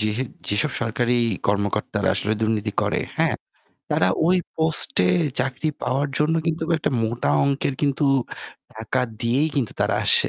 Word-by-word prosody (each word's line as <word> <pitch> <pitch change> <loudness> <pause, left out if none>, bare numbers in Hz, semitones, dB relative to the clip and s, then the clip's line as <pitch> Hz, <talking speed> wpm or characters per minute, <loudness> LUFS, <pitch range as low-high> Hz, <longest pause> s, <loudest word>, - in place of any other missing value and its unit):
যেহ 110 0 0 0.3
যেসব 105 -1 +2
সরকারি 120 +1 0 0.3
কর্মকর্তারা 100 0 -1
আসলে 105 - +1
দুর্নীতি 110 -1 -1
করে, - - 0 0.2
হ্যাঁ, - - +2 0.6
তারা 90 - +2 0.2
ওই 180 +2 +4 0.2
পোস্টে 160 - +4 0.3
চাকরি 135 +4 -2
পাওয়ার 135 +3 0
জন্য 150 +2 +2
কিন্তুক 160 0 -2
একটা - - -1
মোটা 110 -9 -1
অংকের 140 -1 0
কিন্তু 145 +1 +1 0.7
টাকা 110 +4 -2 0.2
দিয়েই 130 +6 +1
কিন্তু 130 -6 -1
তারা - - +2
আসে, - - +5
120 Hz, 140 wpm, -22 LUFS, 105-145 Hz, 0.7 s, আসে